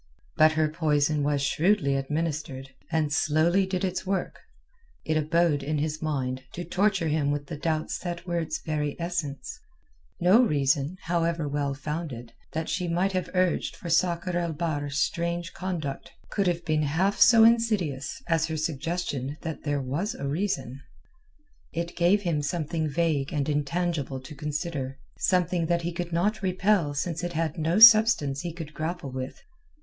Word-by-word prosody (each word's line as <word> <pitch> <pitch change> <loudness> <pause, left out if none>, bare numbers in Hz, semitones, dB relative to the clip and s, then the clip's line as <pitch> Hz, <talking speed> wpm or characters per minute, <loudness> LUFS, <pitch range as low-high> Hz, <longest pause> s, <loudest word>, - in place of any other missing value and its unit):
But 155 0 +5
her 155 0 +2
poison 150 -1 +1
was 145 -1 0
shrewdly 155 0 +2
administered, 140 -1 -3 0.2
and 155 -2 +1
slowly 165 +7 +2
did 190 0 -1
its 185 0 -2
work. 190 -1 -2 0.7
It 155 - 0
abode 155 -1 +2
in 150 +2 -2
his 155 +1 -2
mind 130 -4 -2
to 175 - -5
torture 190 0 +1
him 150 -2 +1
with 145 0 -2
the 155 - -6
doubts 155 +1 -2
that 175 -1 -5
were 170 -1 -1
its 160 -1 -2
very 150 -2 -1
essence. 165 -6 -4 0.6
No 185 +7 +6
reason, 145 - +1
however 170 -2 0
well 140 -1 -1
founded, 145 -6 -5 0.2
that 160 0 -2
she 180 -1 -1
might 180 +3 +1
have 185 -1 -2
urged 185 -1 +1
for 170 - -6
Sakr 175 +1 +1
el 170 -2 -1
Bahr's 145 -3 -2
strange 170 +4 -1
conduct 165 -7 -4 0.2
could 200 -2 +1
have 175 -1 -1
been 155 -2 +1
half 165 +8 +1
so 225 -1 +7
insidious 215 - +2
as 165 -1 +1
her 160 -1 -3
suggestion 150 -2 -3
that 160 -2 -6
there 145 -2 0
was 165 - -2
a 140 - -4
reason. 140 - -2 0.9
It 170 +1 -3
gave 180 +4 +3
him 165 -5 0
something 155 +1 -2
vague 150 -3 0
and 145 -3 -1
intangible 150 -1 -1
to 135 - -10
consider. 150 -2 -4 0.2
Something 180 -2 +1
that 170 0 +1
he 175 +1 -2
could 175 0 -4
not 205 +6 0
repel 185 -5 +1
since 165 +3 -2
it 175 0 -3
had 165 +1 -2
no 165 +4 +1
substance 215 - +7
he 175 - -4
could 160 -2 -8
grapple 160 -2 -4
with. 130 0 -5
160 Hz, 165 wpm, -27 LUFS, 145-175 Hz, 0.9 s, so